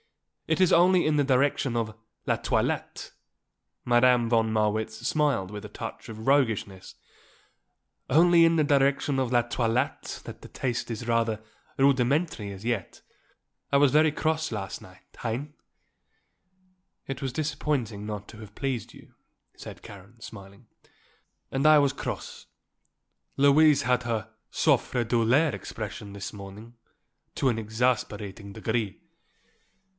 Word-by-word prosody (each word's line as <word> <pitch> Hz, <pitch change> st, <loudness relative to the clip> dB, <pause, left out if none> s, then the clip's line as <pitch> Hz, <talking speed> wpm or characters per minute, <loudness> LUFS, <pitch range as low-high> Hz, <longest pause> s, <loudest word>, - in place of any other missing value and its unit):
It -, -, +1 dB
is 185 Hz, -2 st, +4 dB
only 180 Hz, +1 st, +5 dB
in 155 Hz, -, +2 dB
the 145 Hz, -, +3 dB
direction 135 Hz, -2 st, +1 dB
of 110 Hz, -2 st, -2 dB, 0.3 s
la -, -, +2 dB
toilette," -, -, -2 dB, 0.7 s
Madame 120 Hz, 0 st, +4 dB
von 115 Hz, -1 st, +2 dB
Marwitz 110 Hz, 0 st, 0 dB
smiled 140 Hz, -9 st, 0 dB
with 105 Hz, -1 st, -7 dB
a -, -, -8 dB
touch -, -, -8 dB
of 110 Hz, +1 st, -8 dB
roguishness, 110 Hz, -9 st, 0 dB, 1.1 s
"only 170 Hz, +4 st, +6 dB
in 165 Hz, 0 st, +4 dB
the 155 Hz, -, +4 dB
direction 140 Hz, -1 st, +2 dB
of 130 Hz, -2 st, -1 dB
la 120 Hz, -1 st, +3 dB
toilette 120 Hz, +2 st, -2 dB
that -, -, -9 dB
the -, -, -12 dB
taste 120 Hz, -2 st, -3 dB
is 115 Hz, +1 st, -5 dB
rather 115 Hz, -2 st, +1 dB, 0.4 s
rudimentary 135 Hz, -, +1 dB
as 100 Hz, +2 st, -10 dB
yet. 120 Hz, -6 st, -3 dB, 0.7 s
I 140 Hz, -, +5 dB
was 140 Hz, -2 st, +5 dB
very 155 Hz, +1 st, +5 dB
cross 160 Hz, 0 st, -1 dB
last 100 Hz, -3 st, -5 dB
night, 90 Hz, 0 st, -16 dB, 0.2 s
hein?" 125 Hz, +6 st, -4 dB, 1.5 s
"It 135 Hz, -2 st, -5 dB
was 135 Hz, -2 st, -2 dB
disappointing 135 Hz, -8 st, -2 dB
not 105 Hz, -1 st, -6 dB
to 110 Hz, -, -12 dB
have 105 Hz, -2 st, -12 dB
pleased 135 Hz, -4 st, -3 dB
you," -, -, -17 dB, 0.4 s
said -, -, -11 dB
Karen, 100 Hz, +3 st, -13 dB
smiling. 100 Hz, +1 st, -12 dB, 0.9 s
"And 135 Hz, +2 st, -1 dB
I 155 Hz, 0 st, +8 dB
was 140 Hz, -2 st, +3 dB
cross. -, -, -6 dB, 0.9 s
Louise 145 Hz, +1 st, +5 dB
has 125 Hz, +1 st, +2 dB
her 110 Hz, -2 st, -3 dB, 0.2 s
souffre 120 Hz, -2 st, +1 dB
douleur 120 Hz, +7 st, +2 dB
expression 105 Hz, -1 st, -7 dB
this 100 Hz, 0 st, -7 dB
morning 105 Hz, +3 st, -10 dB, 0.6 s
to 135 Hz, -, 0 dB
an 115 Hz, -2 st, -1 dB
exasperating 110 Hz, -3 st, -2 dB
degree." 110 Hz, -2 st, -2 dB
120 Hz, 135 wpm, -27 LUFS, 110-140 Hz, 1.5 s, I